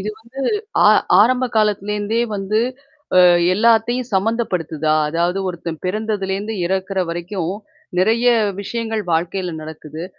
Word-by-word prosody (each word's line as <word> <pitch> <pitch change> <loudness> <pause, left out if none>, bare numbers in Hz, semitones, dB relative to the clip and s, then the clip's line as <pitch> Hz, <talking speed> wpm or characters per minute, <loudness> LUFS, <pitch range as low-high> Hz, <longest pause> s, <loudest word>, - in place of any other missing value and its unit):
இது 210 +3 -3
வந்து 235 +4 -10 0.5
ஆ - - +8 0.3
ஆரம்ப 250 +4 +3
காலத்துலேருந்தே 210 +1 0 0.2
வந்து, 200 +3 0 0.6
அ - - +7 0.4
எல்லாத்தையும் 230 +3 +2
சம்மந்தப்படுத்துதா! 180 -8 0
அதாவது 170 +4 0
ஒருத்தன் 170 -2 -6
பிறந்ததுலேருந்து 205 +1 -2
இறக்கிற 190 +1 -1
வரைக்கும் 175 +1 -3 0.5
நிறைய 225 +6 +2 0.3
விஷயங்கள் 225 +1 -3
வாழ்க்கையில 175 +2 -1
நடக்குது. 155 +1 -8
195 Hz, 105 wpm, -19 LUFS, 175-220 Hz, 0.6 s, ஆ